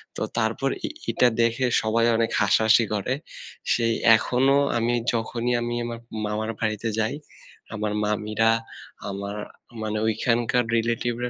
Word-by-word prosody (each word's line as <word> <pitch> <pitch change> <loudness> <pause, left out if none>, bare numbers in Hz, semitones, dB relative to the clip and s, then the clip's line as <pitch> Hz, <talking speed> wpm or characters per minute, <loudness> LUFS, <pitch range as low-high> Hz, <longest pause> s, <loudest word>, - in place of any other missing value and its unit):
তো - - -6 0.2
তারপর - - 0 0.2
ই - - -1 0.2
ইটা 125 - +4
দেখে 115 +2 +1 0.2
সবাই 115 +1 +1
অনেক 115 -1 +1
হাসাহাসি 110 +3 +4
করে। 105 +5 -1 0.6
সেই 115 -1 +1 0.2
এখনো 135 +4 +2 0.2
আমি 115 +1 +1 0.2
যখনই 120 +1 -1
আমি 120 0 -2
আমার 115 -1 -5 0.3
মামার 110 +1 -2
বাড়িতে 110 0 -1
যাই 110 - 0 0.6
আমার 105 -1 -2
মামিরা, 105 +1 +1 0.6
আমার 100 +1 -5 0.5
মানে 110 0 -2
ওইখানকার 120 +2 +1
relative 115 +1 0
রা 125 - -1
115 Hz, 135 wpm, -24 LUFS, 110-120 Hz, 0.6 s, ইটা